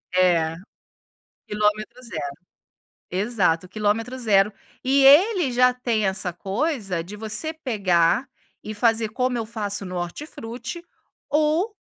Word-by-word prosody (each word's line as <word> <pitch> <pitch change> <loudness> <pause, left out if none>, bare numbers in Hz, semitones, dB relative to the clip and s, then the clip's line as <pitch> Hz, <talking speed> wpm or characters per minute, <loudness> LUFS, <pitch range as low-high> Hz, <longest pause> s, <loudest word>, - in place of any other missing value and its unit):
É, 170 -3 +3 0.9
quilômetro 210 +3 -1
0, 155 - -5 0.8
exato, 185 -3 0
quilometro 215 +5 -1
0, 210 -4 +3 0.3
e 270 +1 +4
ele 340 - +6
já 250 +1 +4
tem 235 -4 0
essa 190 -1 0
coisa 195 - -2
de 190 +5 -9
você 220 +9 -2
pegar 210 - +1 0.3
e 215 - -6
fazer, 225 +1 +2
como 250 +3 -1
eu 230 - -2
faço 205 -3 -3
no 180 -1 -6
hortifruti, 240 - -6 0.4
ou 315 +8 +1
220 Hz, 115 wpm, -23 LUFS, 195-255 Hz, 0.9 s, ele